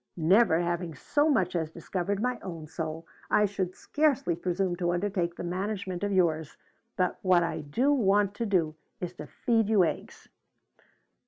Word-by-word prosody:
Never 170 +1 +4
having 175 -1 -2
so 290 - +1
much 190 -11 +1
as 160 -2 -1
discovered 180 +4 -3
my 250 -1 -1
own 170 -4 -7
soul, 160 +1 -5 0.2
I 210 - +4
should 190 -2 -3
scarcely 290 - +1
presume 180 +1 -1
to 175 -1 0
undertake 175 -2 -1
the - - -6
management 185 +1 -3
of 205 - 0
yours, 160 -5 +1 0.4
but 180 -2 0
what 180 -2 +4
I 170 - -2
do 240 - +1
want 205 -5 +3
to 230 - -1
do 170 -6 +1 0.3
is 180 -1 -4
to 150 - -7
feed 225 +2 0
you 210 -4 +5
eggs! 160 -3 -4
185 Hz, 165 wpm, -28 LUFS, 170-205 Hz, 0.4 s, you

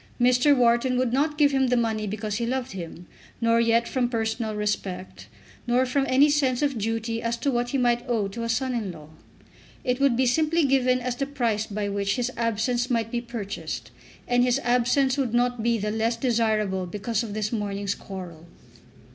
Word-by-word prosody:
Mr. 250 +4 +4
Wharton 245 +1 +3
would 250 -2 0
not 295 +3 +1
give 290 -2 +4
him 265 -1 +2
the 250 0 +2
money 220 -2 0
because 210 0 -3
he 235 - -1
loved 260 +1 -2
him, 175 -2 -8 0.3
nor 230 0 +3
yet 230 0 +2
from 250 -2 0
personal 225 -1 -2
respect, 200 -3 -4 0.4
nor 245 +2 +3
from 270 +2 0
any 270 +3 +5
sense 285 -3 +1
of 280 -2 +1
duty 225 +1 -2
as 230 0 -1
to 275 +4 0
what 240 -1 -1
he 275 - 0
might 240 -1 +2
owe 220 -4 +1
to 200 +4 -7
a 230 - -3
son 260 +2 0
in 220 -6 -2
law. 155 -3 -12 0.7
It 250 +1 0
would 275 -4 +3
be 260 - +3
simply 310 +5 +2
given 255 -2 +3
as 250 0 -2
the 275 - -2
price 230 -6 -1
by 205 0 -3
which 200 0 -1
his 245 0 -1
absence 235 +2 0
might 230 -2 0
be 240 - -1
purchased, 195 - -6 0.4
and 245 0 +3
his 250 +2 +2
absence 250 +3 +2
would 245 -4 0
not 245 -1 +1
be 235 +1 +2
the 210 0 -2
less 225 +2 0
desirable 220 -6 0
because 210 +4 -2
of 215 -3 -5
this 215 0 -2
morning's 200 -3 -2
quarrel. 175 -5 -9
235 Hz, 195 wpm, -25 LUFS, 215-250 Hz, 0.7 s, any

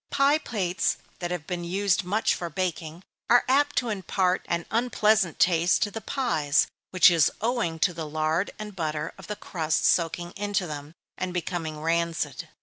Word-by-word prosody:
Pie 280 +2 +3
plates 190 - -1 0.2
that 175 - -3
have 175 -3 -4
been 175 -1 -4
used 190 +2 +1
much 205 +5 +1
for 170 - -4
baking, 170 0 -4 0.3
are 245 +1 +5
apt 285 +3 +3
to 245 - +1
impart 190 -2 0
an 170 0 -1
unpleasant 220 -6 +2
taste 175 0 +3
to 205 - -2
the 225 - -6
pies, 160 - +1 0.2
which 185 -1 +6
is 165 -3 +4
owing 225 -8 -1
to 175 +3 +2
the 160 -2 -6
lard 155 +4 0
and 210 -2 -7
butter 155 -2 -3
of - - -11
the 210 - -4
crust 165 -6 -1
soaking 175 0 +1
into 205 -1 -2
them, 150 0 -7 0.2
and 185 -1 -3
becoming 165 -3 -3
rancid. 165 +1 -1
180 Hz, 170 wpm, -26 LUFS, 165-205 Hz, 0.3 s, which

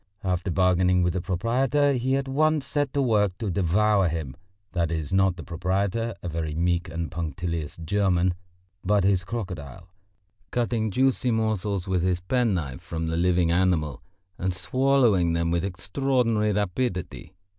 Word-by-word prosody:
After 90 0 -1
bargaining 90 0 +3
with 90 -1 +1
the 90 - -2
proprietor 125 +10 +1
he 130 +1 0
at 135 0 -1
once 150 +2 +1
set 145 -2 -1
to 140 - +1
work 105 -6 +2
to 105 -4 -2
devour 100 +2 +2
him 80 -5 -4 0.4
(that 85 -3 0
is, 80 -1 -3
not 95 -1 +3
the - - -8
proprietor, 100 +6 -1
a - - -4
very 80 -2 -3
meek 85 +2 0
and 85 0 -4
punctilious 85 -1 -4
German, 90 +1 +1 0.5
but 100 0 +2
his 95 -2 +2
crocodile), 90 - -6 0.6
cutting 115 -2 0
juicy 130 +2 +1
morsels 105 -4 -1
with 95 -2 +1
his 90 0 +1
penknife 90 - -1
from 80 -1 -4
the 80 - -1
living 85 0 +2
animal, 85 -5 +1 0.4
and 90 0 -1
swallowing 115 -5 +2
them 85 0 0
with 85 0 0
extraordinary 110 +3 0
rapidity. 100 -2 -2
95 Hz, 150 wpm, -25 LUFS, 85-115 Hz, 0.6 s, bargaining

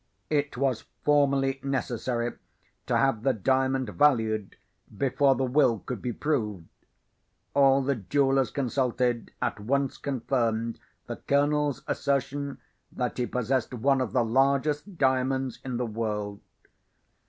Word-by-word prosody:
It 145 -4 0
was 130 -3 0 0.2
formally 140 -2 +2
necessary 120 -3 -2 0.5
to - - +2
have 135 -6 +2
the 135 +2 +2
Diamond 130 +2 +1
valued, 110 -6 +2 0.4
before 135 +1 +3
the 135 - -1
Will 130 -2 +3
could 120 -1 -6
be 125 - -2
proved. 105 - -2 0.9
All 135 -1 +5
the 140 +1 +1
jewellers 135 +3 +2
consulted, 125 -2 0
at - - -1
once 135 +5 -1
confirmed 115 -4 -1 0.3
the - - -6
Colonel's 145 0 +1
assertion 140 0 -1 0.3
that 125 0 -3
he 120 - 0
possessed 125 0 -1
one 135 +3 +2
of 125 -6 -2
the 120 0 +2
largest 140 - +1
diamonds 130 -2 +1
in 130 -2 -3
the 125 - -1
world. 105 -2 -3
130 Hz, 125 wpm, -27 LUFS, 120-140 Hz, 0.9 s, All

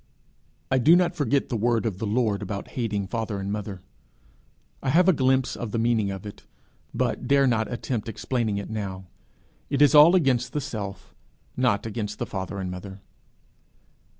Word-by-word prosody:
I 130 - +4
do 155 +8 +6
not 175 0 +2
forget 145 -4 0
the 120 - -2
word 115 +1 +1
of 100 -5 -2
the 110 - -2
Lord 105 -2 0
about 100 0 -5
hating 105 -5 -2
father 110 -1 -3
and 100 +1 -4
mother: 100 -3 -5 1.0
I - - -2
have 175 +6 +4
a 190 - +6
glimpse 130 -2 +1
of 120 - -5
the 110 - -3
meaning 115 -3 +1
of 95 +1 -6
it, 105 - -9 0.5
but - - -2
dare 140 0 +4
not 115 -3 +1
attempt 120 -2 -3
explaining 115 -1 -2
it 100 +2 -5
now. 95 -3 -5 0.6
It 140 - 0
is 145 0 +6
all 155 +4 +8
against 130 -7 +1
the 150 - 0
self 105 -9 -6 0.4
not 120 -5 +1
against 105 -2 -4
the - - -3
father 95 +1 -5
and 95 -2 -4
mother. 95 +2 -8
115 Hz, 180 wpm, -25 LUFS, 100-130 Hz, 1.0 s, all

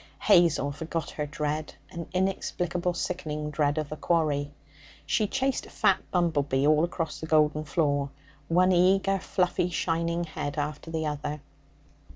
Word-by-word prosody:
Hazel 165 -5 +4
forgot 160 +1 -4
her 150 -1 -3
dread 150 +1 -3 0.2
an 170 -1 -6
inexplicable 180 -2 -1
sickening 150 -5 -3
dread 145 0 +1
of 155 -2 -2
the 155 - -4
quarry. 150 -3 0 0.5
She 150 +9 +1
chased 265 +3 -1
a - - -14
fat - - +2
bumble 170 -5 +2
bee 140 0 0
all 155 +1 +4
across 170 -1 -2
the 160 - -6
golden 155 -1 +3
floor 145 -3 +1 0.4
one 180 +2 +4
eager, 190 +2 +3
fluffy, 180 -2 0
shining 170 0 -1
head 145 -3 -5
after 150 +2 -3
the 160 -1 -2
other. 150 0 -3
160 Hz, 150 wpm, -27 LUFS, 150-175 Hz, 0.5 s, Hazel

